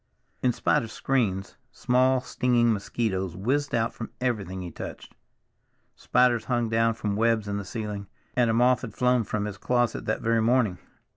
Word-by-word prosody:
In 125 - +3
spite - - +1
of 115 - -7
screens, 105 -7 -1
small 130 +1 +2
stinging 120 -2 +2
mosquitoes 95 -4 -2
whizzed 135 +8 0
out 115 0 0
from 115 - -7
everything 100 -7 -2
he 85 - -6
touched; - - -8 0.8
spiders 125 -2 +2
hung 120 -3 0
down 115 0 +2
from 105 -2 -2
webs 110 -1 +1
in 100 0 -2
the 100 - -4
ceiling, 105 -1 -5 0.3
and 120 -2 +3
a - - +2
moth 125 +1 +4
had 125 - -7
flown 125 -1 +2
from 105 0 -2
his 100 -2 -6
closet 120 -2 0
that 110 - -1
very 115 0 +2
morning. 115 -5 +2
115 Hz, 170 wpm, -26 LUFS, 105-125 Hz, 0.8 s, moth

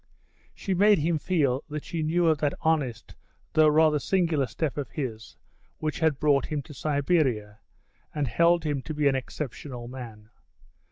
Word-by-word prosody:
She 195 - -2
made 205 +3 +5
him 160 +1 0
feel 145 -7 +1
that 150 0 -5
she 165 - -3
knew 165 +3 +1
of 160 -3 +3
that 145 -2 0
honest 140 -9 -1 0.4
though 155 0 +5
rather 155 0 +4
singular 165 -6 +1
step 140 +5 -3
of 140 -5 -4
his 110 -7 -6 0.4
which 155 0 -3
had 160 -4 +1
brought 145 -3 +2
him 150 -2 -3
to 150 - -12
Siberia, 135 -8 0 0.5
and 150 -3 -2
held 170 +7 +3
him 145 -3 -1
to 155 +3 -6
be 150 -1 +2
an 135 - +3
exceptional 130 -2 -6
man. 115 -4 -10
150 Hz, 165 wpm, -27 LUFS, 130-160 Hz, 0.5 s, made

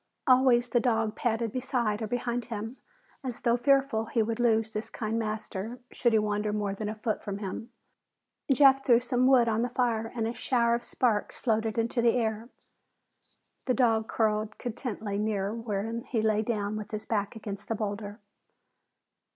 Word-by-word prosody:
Always 255 -2 +5
the 240 - +3
dog 225 -3 +1
padded 230 -1 -1
beside 240 -4 -1
or 220 - -2
behind 245 +1 -2
him, 225 +2 -5 0.5
as 250 -3 -5
though 235 0 +3
fearful 270 -3 +2
he 225 -1 +1
would 225 +1 -3
lose 225 -2 +2
this 215 0 -4
kind 225 0 -2
master 215 0 -4
should 240 - +1
he 220 - +4
wander 210 0 0
more 205 -1 -1
than 210 +1 -4
a 215 - -4
foot 215 0 -2
from 200 -2 -4
him. 205 +3 -5 0.8
Jeff 270 0 +6
threw 235 -3 +5
some 250 0 +1
wood 255 -3 +5
on 225 0 +1
the 245 - 0
fire 230 -3 0
and 225 -2 0
a 230 - -2
shower 235 -2 +1
of 235 0 -1
sparks 225 -5 0
floated 220 -1 0
into 230 +1 +1
the 235 0 +4
air. 225 -1 -1 1.2
The 255 - +1
dog 225 -3 +2
curled 215 -1 0
contentedly 220 -4 -4
near 210 -1 -1
when 225 0 -3
he 225 -4 -1
lay 215 -1 +2
down 210 -2 -2
with 210 -1 -6
his 215 -1 -5
back 205 -1 -1
against 205 -2 -7
the 225 - -1
boulder. 205 0 -4
225 Hz, 175 wpm, -28 LUFS, 215-240 Hz, 1.2 s, Jeff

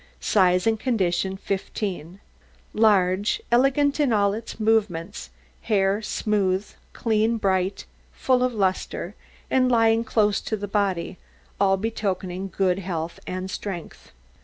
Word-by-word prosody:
SIZE 180 -3 +3
AND 225 -1 +2
CONDITION 190 -6 0
15 190 -3 -4 0.5
Large, 205 - +3
elegant 275 +4 +3
in 285 -4 +2
all 200 -2 +3
its 225 +1 -7
movements, 200 - 0 0.3
hair 200 -1 +1
smooth, 205 -2 0 0.2
clean, 225 0 +1
bright, 190 -2 0 0.3
full 255 -1 +1
of 255 0 +2
lustre, 190 -3 -2 0.4
and 255 -1 +3
lying 225 -1 +3
close 210 -3 +1
to 220 - -3
the 205 0 -5
body, 195 -3 -1 0.4
all 195 -1 +3
betokening 190 -3 -3
good 190 0 0
health 170 -3 -4
and 185 +1 -4
strength. 185 -5 -7
200 Hz, 120 wpm, -24 LUFS, 185-225 Hz, 0.5 s, SIZE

